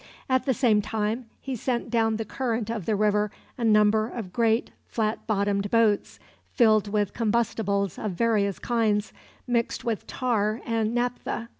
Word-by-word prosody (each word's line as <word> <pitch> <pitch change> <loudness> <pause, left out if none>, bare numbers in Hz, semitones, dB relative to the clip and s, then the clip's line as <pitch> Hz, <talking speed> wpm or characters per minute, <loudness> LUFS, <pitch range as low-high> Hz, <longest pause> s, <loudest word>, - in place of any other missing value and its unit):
At 260 +1 +1
the 265 - +4
same 225 -5 +3
time 220 +3 -2
he 265 -1 -4
sent 240 0 -2
down 225 -2 +2
the 220 0 -3
current 230 -1 -2
of 215 -7 -4
the 220 - +2
river 210 0 +2 0.3
a 245 - -5
number 215 0 +4
of 210 -8 -7
great 230 0 +1 0.2
flat 220 -1 -2
bottomed 200 -1 0
boats, 225 -2 +2 0.4
filled 215 -4 +4
with 205 -1 0
combustibles 210 -4 0
of 210 -3 -3
various 205 -1 +1
kinds, 220 -3 0 0.3
mixed 235 -2 -1
with 225 -3 -2
tar 220 -3 0
and 225 0 0
naphtha. 240 -1 -2
220 Hz, 155 wpm, -26 LUFS, 210-235 Hz, 0.4 s, the